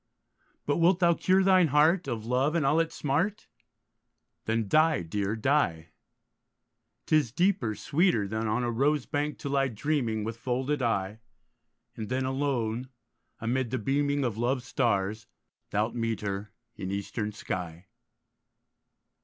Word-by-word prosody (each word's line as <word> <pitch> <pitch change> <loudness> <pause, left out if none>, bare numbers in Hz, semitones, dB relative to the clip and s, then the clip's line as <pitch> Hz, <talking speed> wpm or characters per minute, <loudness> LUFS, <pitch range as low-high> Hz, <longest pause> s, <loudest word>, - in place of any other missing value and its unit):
But 145 - +1
wilt 170 +2 +4
thou 170 -2 +5
cure 185 +3 +2
thine 185 -3 +5
heart 155 +5 +3
Of 115 -4 -3
love 130 +6 +1
and 160 -5 +1
all 150 +4 +3
its 165 0 -1
smart, 165 +9 -1 1.0
Then 110 -1 0
die, 155 - +3
dear, 100 +5 -2
die; 110 - +1 1.2
'Tis 150 -7 +2
deeper, 170 - +1
sweeter, 150 - +1
Than 110 +2 -2
on 110 +3 0
a 120 - 0
rose 140 +3 +1
bank 150 0 -2
to 140 - -5
lie 135 -1 +2
dreaming 120 -2 -1
With 115 +1 -4
folded 130 +4 -1
eye; 105 -3 -1 0.8
And 110 -2 -6
then 130 +1 0
alone, 130 -3 -1 0.5
amid 120 +2 -1
the 130 - -1
beaming 140 +4 0
Of 115 -3 -3
love's 125 +1 0
stars, 105 -3 0 0.4
thou'lt 105 +3 0
meet 115 -2 -2
her 100 0 -4 0.2
In 95 - -5
eastern 100 +2 -3
sky. 90 -4 -5
125 Hz, 140 wpm, -28 LUFS, 110-150 Hz, 1.2 s, thou